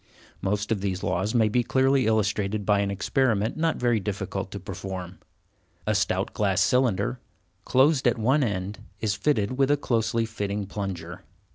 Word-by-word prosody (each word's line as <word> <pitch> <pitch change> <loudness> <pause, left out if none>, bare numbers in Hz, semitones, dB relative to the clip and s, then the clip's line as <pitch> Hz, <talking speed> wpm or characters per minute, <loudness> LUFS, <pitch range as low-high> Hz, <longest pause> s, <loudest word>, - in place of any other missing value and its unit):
Most 105 +2 -1
of 105 -4 0
these 95 -2 -2
laws 105 +6 -1
may 110 -2 +4
be 120 +4 +2
clearly 130 0 +2
illustrated 105 -1 0
by 105 0 +3
an 100 0 0
experiment 110 +2 +1
not 165 0 0
very 120 -2 +2
difficult 95 -1 -4
to 100 - -6
perform. 95 -1 -7 0.7
A - - +1
stout - - 0
glass - - +1
cylinder, 125 -1 +2 0.5
closed 135 +1 +3
at 120 - +2
one 130 +6 +2
end, 100 -2 -3 0.2
is 105 -2 0
fitted 125 0 0
with 135 0 +4
a 145 - +4
closely 115 -3 0
fitting 105 -2 -3
plunger. 95 -4 -5
105 Hz, 160 wpm, -26 LUFS, 100-125 Hz, 0.7 s, may